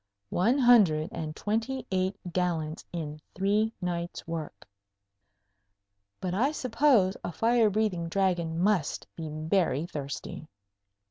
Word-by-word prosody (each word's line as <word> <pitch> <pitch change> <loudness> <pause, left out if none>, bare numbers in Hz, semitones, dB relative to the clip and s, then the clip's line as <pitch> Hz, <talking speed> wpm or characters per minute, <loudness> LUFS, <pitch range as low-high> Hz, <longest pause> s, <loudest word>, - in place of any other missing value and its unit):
One 230 +9 +3
hundred 205 - +5
and 155 -2 -5
twenty 230 +5 -2
eight 185 +1 0 0.2
gallons 165 -3 -1
in 155 -3 -5 0.2
three 205 +3 +2
nights' 175 -2 -4
work! 165 -7 -6 1.5
But 180 -2 -3
I 250 +10 +2
suppose 250 -8 +3
a - - -3
fire 230 +3 +3
breathing 195 -5 0
Dragon 175 -3 0
must 185 -5 +1
be 160 -2 -5
very 155 0 0
thirsty. 145 0 -6
180 Hz, 115 wpm, -28 LUFS, 165-215 Hz, 1.5 s, hundred